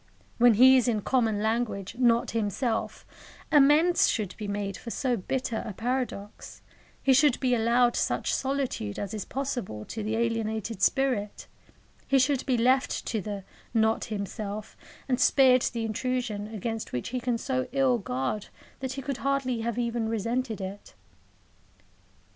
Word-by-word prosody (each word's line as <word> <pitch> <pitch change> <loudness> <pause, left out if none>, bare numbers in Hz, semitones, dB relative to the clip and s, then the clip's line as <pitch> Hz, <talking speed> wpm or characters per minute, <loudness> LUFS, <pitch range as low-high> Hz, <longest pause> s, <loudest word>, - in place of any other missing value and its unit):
When 240 -2 +6
he 260 +4 +8
is 250 - +2
in 220 -3 +1
common 220 -3 +1
language 220 -3 -1
not 235 -2 +3
himself, 225 +2 -2 0.5
amends 300 +4 +5
should 205 -5 -2
be 210 - -6
made 200 -1 -3
for 235 - -8
so 250 +1 0
bitter 235 +3 -2
a 220 -3 -6
paradox; 235 -2 -4 0.4
he 270 - +5
should 280 0 +4
be 255 -2 +1
allowed 240 +1 +3
such - - 0
solitude 265 - -2
as 200 0 -4
is 210 -3 -4
possible 245 - -4
to 225 - -6
the 215 +1 -2
alienated 225 -2 -2
spirit; 245 -5 +1 0.6
he 275 - +4
should 265 0 +2
be 255 -2 +2
left 255 +3 +2
to 220 - -2
the 205 -1 -5 0.3
"not 220 0 +2
himself," 210 0 -5 0.3
and 255 -1 0
spared 255 -1 +5
the 230 -2 -1
intrusion 225 -2 -2
against 225 +1 -4
which 125 - -3
he 250 +1 -2
can 245 -1 -1
so 255 +1 -2
ill 265 -2 +2
guard 135 +5 -3 0.3
that 260 0 -3
he 270 0 -6
could 275 -1 -3
hardly 265 -3 -1
have 235 0 -2
even 235 -2 -1
resented 230 +1 -2
it. 195 +1 -8
235 Hz, 155 wpm, -27 LUFS, 215-255 Hz, 0.6 s, he